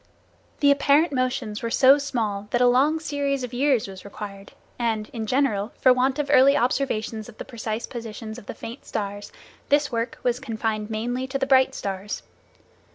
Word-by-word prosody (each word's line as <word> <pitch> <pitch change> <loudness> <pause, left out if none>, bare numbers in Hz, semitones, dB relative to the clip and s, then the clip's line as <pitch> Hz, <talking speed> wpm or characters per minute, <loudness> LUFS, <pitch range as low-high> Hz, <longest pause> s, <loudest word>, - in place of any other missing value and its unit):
The 285 -1 +6
apparent 285 +3 +4
motions 250 -5 -1
were 230 - -2
so 265 +4 +6
small 220 -8 -2
that 240 - +1
a 250 - +5
long 275 +6 +4
series 285 -3 -2
of 250 0 -5
years 260 -3 +2
was 190 -1 -10
required 200 -1 -9 0.3
and, 220 -3 -1
in 225 -2 -4
general, 240 -5 +1
for 255 - +6
want 260 +2 +1
of 290 -1 -1
early 275 +2 +6
observations 230 -4 -1
of 220 - -14
the - - -7
precise 225 -1 -4
positions 225 -1 -7
of 205 - -17
the - - -6
faint 235 +5 -8
stars, 205 -1 -5 0.4
this 290 0 +3
work 230 0 -2
was 245 0 +1
confined 220 -4 -3
mainly 245 +4 -2
to 270 +1 -2
the 270 - 0
bright 265 -1 +4
stars. 195 +1 -4
245 Hz, 180 wpm, -24 LUFS, 215-270 Hz, 0.4 s, The